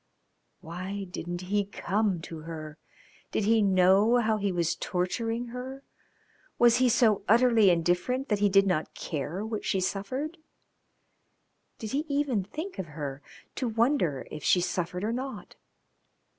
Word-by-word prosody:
Why 185 +5 -5
didn't 175 -1 -5
he 200 +3 0
come 200 -1 -1
to 165 0 -8
her? 155 -1 -8 0.5
Did - - 0
he 220 +2 +4
know 195 +4 +4
how 220 -2 +2
he 200 -1 -1
was 170 -1 0
torturing 225 +6 -2
her? 260 +3 -7 0.7
Was 240 -1 +5
he 255 0 +4
so 220 -4 +3
utterly 230 -2 +5
indifferent 180 - +1
that 210 -2 +1
he 205 0 +3
did 195 0 +5
not 175 -5 -1
care 160 +7 -4
what 220 -1 -4
she 190 - 0
suffered? 255 - -3 1.4
Did 220 - -6
he 290 +3 -1
even 280 -8 0
think 310 - -7
of 185 - -3
her, 140 -2 -5 0.3
to 255 - -2
wonder 225 - +1
if 150 - -7
she 180 - +4
suffered 180 +1 -2
or 220 +2 0
not? 255 -3 -6
200 Hz, 145 wpm, -28 LUFS, 180-235 Hz, 1.4 s, Was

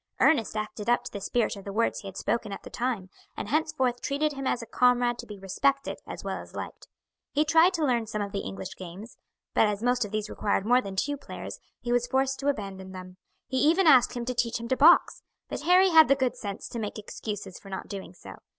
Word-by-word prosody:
Ernest 235 -9 +3
acted 215 +1 -4
up 240 - +3
to - - -7
the 200 - -6
spirit 230 +3 0
of 200 - -10
the 200 - -6
words 230 +3 0
he 200 - -9
had 190 - -8
spoken 225 -1 -1
at 195 - -7
the - - -10
time, 230 -7 -2 0.3
and - - -4
henceforth 260 -4 0
treated 295 +2 0
him 275 -1 -4
as 240 - 0
a - - -7
comrade 245 +1 +2
to - - -7
be 210 - -8
respected 270 +9 0
as - - -7
well - - -3
as - - -14
liked. - - -7 0.5
He 300 +2 +3
tried 325 +4 +5
to 320 -3 +1
learn 240 -4 +1
some 215 -1 -3
of 200 - -6
the 200 - -2
English 95 - -6
games, 185 +5 -9 0.4
but 220 - +4
as 210 +1 -2
most 245 0 +2
of 210 - -5
these 215 0 -2
required 200 -2 -1
more 245 +3 +4
than 195 -4 -7
two 285 +9 -1
players - - -8 0.2
he 240 - -3
was 245 0 +2
forced 265 +1 0
to 275 - -3
abandon 195 -7 -3
them. 185 0 -9 0.3
He 260 - -3
even 330 +7 +4
asked 255 -5 +6
him 240 - -3
to 250 - -2
teach 235 -1 0
him 235 - -6
to 260 - +3
box, 320 +6 +5 0.3
but - - -4
Harry 365 +2 +5
had 320 -1 +8
the 275 - +5
good 255 -3 0
sense 205 -4 -6
to 235 - -5
make 210 -1 -4
excuses 205 -2 -6
for 195 - -13
not 190 - -5
doing 195 -3 -7
so. - - -11
235 Hz, 245 wpm, -27 LUFS, 200-270 Hz, 0.5 s, had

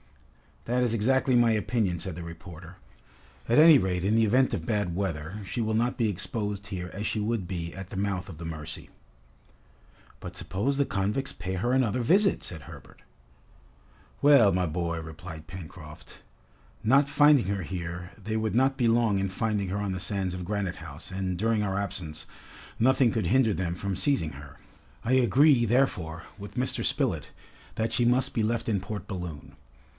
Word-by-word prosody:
"That 125 +2 +1
is 120 -2 +1
exactly 130 +3 +2
my 120 -1 +5
opinion," 105 -4 0
said 95 -2 -4
the 85 - -7
reporter. 85 +1 -10 0.7
"At 120 - +4
any 160 -1 +9
rate 90 -2 -1
in 105 +3 +2
the 115 0 +4
event 130 +5 +3
of - - -3
bad 105 -6 -1
weather, 90 0 -3
she 115 - -3
will 110 0 0
not 120 +2 +1
be 115 -3 +2
exposed 100 +1 -3
here 90 -3 -5
as 105 +2 -4
she 110 - -1
would 105 -3 -1
be 85 -2 -4
at 95 -1 -8
the - - -7
mouth 95 -1 -1
of 85 - -9
the 85 - -7
Mercy." 80 -1 -6 1.3
"But 85 - -8
suppose 100 +10 -2
the 140 - +3
convicts 105 +8 -1
pay 90 +2 -5
her 100 +7 0
another 125 -2 +2
visit," 195 - +3
said 80 -3 -5
Herbert. - - -13 1.2
"Well, 140 -8 +7
my 90 0 +1
boy," 85 0 -2
replied 80 0 -9
Pencroft, 85 -3 -11 0.6
"not 140 +5 +4
finding 145 -4 +5
her 100 0 -2
here, 90 0 -5
they 110 0 -3
would 110 0 -1
not 135 +2 +3
be 120 - +2
long 115 -3 +3
in 95 0 -1
finding 105 0 -1
her 100 - -2
on 100 -1 -2
the 95 - -3
sands 95 -1 -2
of 90 -1 -5
Granite 100 -2 -2
House, 80 +2 -9
and, 95 -1 -2
during 110 +2 +1
our 95 -2 -1
absence, 80 -6 -4 0.5
nothing 130 0 +4
could 110 -1 -1
hinder 125 -3 +3
them 85 -2 -2
from 100 +2 -3
seizing 135 - +1
her! 70 0 -12 0.5
I 120 - +1
agree, 130 +1 +5
therefore, 90 -10 0 0.2
with 100 0 -9
Mr. 130 +1 -1
Spilett, - - 0 0.5
that 110 +1 -1
she 120 - +2
must 125 +2 +2
be 115 - 0
left 115 +1 -1
in 105 -3 +1
Port 100 +1 -6
Balloon. 80 -7 -7
100 Hz, 180 wpm, -27 LUFS, 90-115 Hz, 1.3 s, any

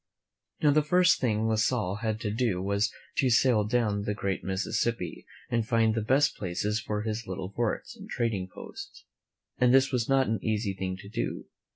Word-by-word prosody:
Now, 150 - +6
the 155 +2 +4
first 180 +4 +4
thing 110 -3 +1
La 110 - +2
Salle 110 -3 +1
had 110 -1 -2
to 105 - -2
do 110 -4 0
was 100 +2 0 0.3
to 130 - +3
sail 120 -3 +4
down 105 -2 +1
the 105 0 -2
great 100 -2 -2
Mississippi 105 +5 -2 0.2
and 115 -2 0
find 115 -2 +3
the 110 - -1
best 135 +6 +3
places 105 +3 -2
for 105 0 -3
his 110 +1 -3
little 95 0 -5
forts 115 +1 -2
and - - -12
trading 110 -6 -1
posts; - - -10 0.5
and 125 -1 +5
this 135 +1 +5
was 125 -2 0
not 135 -1 +4
an 110 -3 -1
easy 105 -2 0
thing 95 -1 -4
to 95 - -11
do. 105 - -3
110 Hz, 190 wpm, -28 LUFS, 100-120 Hz, 0.5 s, Now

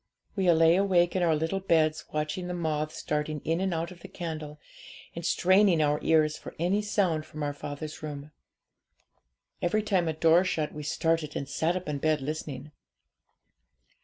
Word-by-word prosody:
'We 190 -3 +3
lay 165 +1 +5
awake 185 -3 +3
in 185 - +1
our 165 -2 +3
little 165 +5 -1
beds 155 -4 +2
watching 155 +4 -2
the 180 - -3
moths 155 -2 -2
darting 150 0 -2
in 165 +3 -1
and 190 0 0
out 170 +1 -2
of 180 - -12
the - - -10
candle, 155 -3 -6 0.6
and 170 - -5
straining 185 +1 +4
our 150 -1 +2
ears 155 -1 +2
for - - -10
any 180 +5 +1
sound 190 -7 0
from 155 -1 -7
our 145 0 -1
father's 145 +2 -7
room. 150 -1 -7 1.3
Each 210 +5 +1
time 185 -5 +1
a 160 - 0
door 165 +3 +4
shut 160 -5 -2
we 150 - -6
started, 160 0 -1
and 140 - -3
sat 160 +5 0
up 185 -2 -4
in 145 -2 -2
bed 155 +1 +1
listening. 150 0 -5
160 Hz, 175 wpm, -28 LUFS, 150-175 Hz, 1.3 s, lay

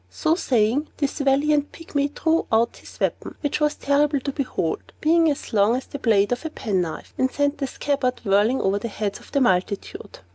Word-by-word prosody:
So 315 -1 +1
saying, 255 - +1
this 285 0 -2
valiant 285 +1 +2
Pygmy 285 -3 -2
drew 325 0 +1
out 230 +1 +2
his - - -14
weapon - - -2
(which 290 -1 -1
was 300 0 +1
terrible 285 +1 +2
to 280 - -3
behold, 255 - -3
being 325 +1 +4
as 285 -4 -4
long 210 +2 +4
as 260 - -3
the 285 - -7
blade 210 -4 +3
of 245 - -1
a 320 - -3
penknife), 185 - -3
and 260 - +3
sent 285 0 0
the 275 - -1
scabbard 260 -2 -1
whirling 205 +6 +3
over 195 +1 +1
the 235 - -4
heads 205 -2 -3
of - - -17
the 280 - +1
multitude. 190 -3 -1
270 Hz, 195 wpm, -23 LUFS, 215-290 Hz, -, being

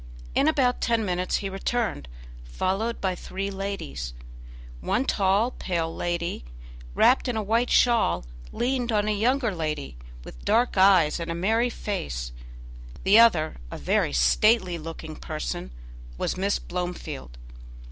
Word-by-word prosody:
In 280 - +3
about 260 -5 +2
ten 230 -2 +1
minutes 180 -1 -1
he - - 0
returned, 195 - -2 0.4
followed 190 - -2
by 190 -2 0
three 195 +2 -5
ladies; 130 - -5 0.6
one 245 - 0
tall, 200 +3 +2
pale 165 -6 -3
lady, 170 - -2 0.5
wrapped 260 - +4
in 245 -3 -1
a 215 - -1
white 230 +4 +1
shawl, 225 - +3 0.3
leaned 245 -1 -1
on 210 -1 +1
a - - +2
younger 235 +2 +1
lady, 155 - -4 0.3
with - - -12
dark 240 +2 +2
eyes 185 -5 +5
and 170 0 -4
a 165 - -2
merry 225 +7 +1
face; 65 - -4 0.7
the 200 +4 +6
other, 175 -10 +4
a - - -7
very - - +1
stately 175 - +3
looking 160 0 -7
person, 155 - -5 0.5
was - - -1
Miss 195 +2 0
Blomefield. 175 - -6
190 Hz, 135 wpm, -26 LUFS, 160-225 Hz, 0.7 s, the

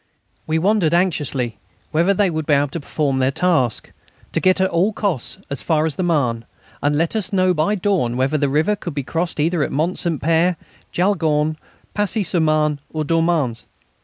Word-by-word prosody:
We 160 0 +1
wondered 180 -2 +2
anxiously 145 -9 0 0.3
whether 170 +5 +3
they 200 -1 +2
would 155 -2 -3
be 150 - +4
able 140 0 +1
to 170 - -5
perform 140 -2 -1
their 130 0 +2
task 140 -6 0 0.4
to - - 0
get 185 0 +3
at 190 0 +2
all 185 +6 +2
costs 190 - -2
as 140 - -2
far 155 -1 +1
as 155 -3 -1
the - - -3
Marne, 130 -10 0 0.4
and 145 +1 +1
let 165 +7 0
us 215 -3 -1
know 185 -2 +3
by 165 +6 +1
dawn 180 - 0
whether 135 +4 +1
the 140 -1 +1
river 155 +9 +2
could 175 -6 -7
be 140 - -2
crossed 165 +5 -3
either 165 +2 +1
at - - -1
Mont 165 +6 0
Saint 165 -5 0
Père, 165 +3 +2 0.4
Jaulgonne, 155 -5 +1 0.4
Passy 210 +1 0
sur 175 - +1
Marne, 155 -2 +2
or 155 -1 -2
Dormans. 165 -7 0
160 Hz, 190 wpm, -20 LUFS, 145-180 Hz, 0.4 s, be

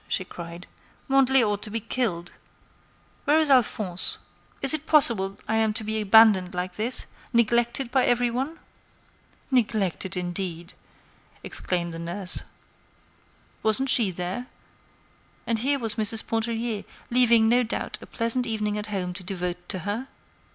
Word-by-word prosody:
she 185 - -2
cried. 170 0 -9 0.4
"Mandelet 270 -1 +4
ought 205 -1 -1
to - - -3
be 225 +2 -2
killed! 210 -7 -3 0.9
Where 295 +1 +4
is 310 -3 +3
Alphonse? 210 -8 +2 0.5
Is 275 - +4
it 310 0 -2
possible 210 -10 +3
I 220 - 0
am 220 -1 +1
to 220 +1 -4
be 220 0 -2
abandoned 205 -3 +5
like 180 0 -4
this—neglected 235 +2 0
by 260 -1 +2
every 245 0 +1
one?" 270 +7 -3 0.9
"Neglected, 205 -7 0
indeed!" 175 -1 -4 0.7
exclaimed 175 -2 -3
the 165 - -6
nurse. 180 +2 0 1.2
Wasn't 220 +5 +4
she 225 -5 +3
there? 185 +7 -5 1.0
And 230 -1 -1
here 280 +4 +2
was 225 -5 -2
Mrs. 220 +1 0
Pontellier 225 -1 -2 0.3
leaving, 235 -2 +5
no 240 +2 +4
doubt, 235 0 -4
a - - -11
pleasant 240 +1 +4
evening 210 -2 -1
at 210 - -6
home 185 -4 -3
to 185 +1 -7
devote 180 -1 -5
to 185 - -2
her? 220 +6 -3
220 Hz, 140 wpm, -25 LUFS, 185-245 Hz, 1.2 s, abandoned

